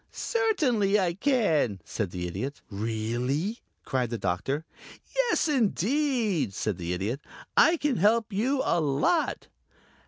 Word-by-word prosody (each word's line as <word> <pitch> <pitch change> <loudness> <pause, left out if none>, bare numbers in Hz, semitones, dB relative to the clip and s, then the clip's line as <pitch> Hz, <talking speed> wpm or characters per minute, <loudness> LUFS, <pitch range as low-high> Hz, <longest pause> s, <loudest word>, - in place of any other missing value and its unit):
"Certainly 260 - +1
I 180 -3 +1
can," 175 - +1
said 105 -5 -3
the 90 0 -4
Idiot. 130 +11 -5
"Really?" 120 - -2 0.3
cried 125 -3 0
the 115 - -3
Doctor. 110 - -2 0.5
"Yes, - - +2
indeed," 235 - +1
said 105 -5 -2
the 85 0 -3
Idiot. 105 +10 -2 0.3
"I 335 +1 +6
can 295 -6 0
help 220 +3 +2
you 260 +7 +1
a 170 - +2
lot." 150 - +1
170 Hz, 125 wpm, -27 LUFS, -, 0.5 s, I